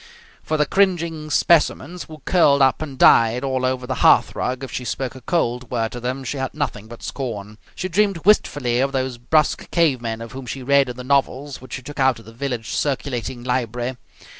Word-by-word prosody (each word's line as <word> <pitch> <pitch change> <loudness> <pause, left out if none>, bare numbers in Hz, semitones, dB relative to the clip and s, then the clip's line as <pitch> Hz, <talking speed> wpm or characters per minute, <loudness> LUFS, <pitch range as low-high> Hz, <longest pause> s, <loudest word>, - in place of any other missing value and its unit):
For 155 - -1
the 150 - +3
cringing 170 -4 0
specimens 170 +2 +2
who 155 -3 -13
curled 145 -6 +4
up 130 +2 +3
and 140 -4 -6
died 115 0 +5
all 130 -1 -1
over 130 0 -1
the 130 0 -3
hearthrug 130 +1 +3
if 135 - -6
she 125 - -4
spoke 125 +1 -3
a 130 - -12
cold 125 -5 -1
word 115 -2 -1
to 120 - -6
them 130 +2 -3
she 135 +3 -4
had 130 +1 -4
nothing 110 -8 -3
but 120 0 -11
scorn. 105 -5 -5 0.2
She 185 - -3
dreamed 195 -2 0
wistfully 135 - +3
of 135 +1 +1
those 130 -2 -2
brusque 150 +5 +1
cavemen 125 -9 +1
of 115 0 -8
whom 130 -1 -8
she 130 +2 -5
read 140 0 +3
in 125 - -5
the 125 - -6
novels 140 +1 0
which 130 -2 -11
she 130 - -5
took 145 +3 -9
out 130 -2 +3
of 115 - -14
the 115 - -13
village 120 -2 -4
circulating 130 -4 -2
library. 125 0 -2
130 Hz, 205 wpm, -21 LUFS, 120-145 Hz, 0.2 s, died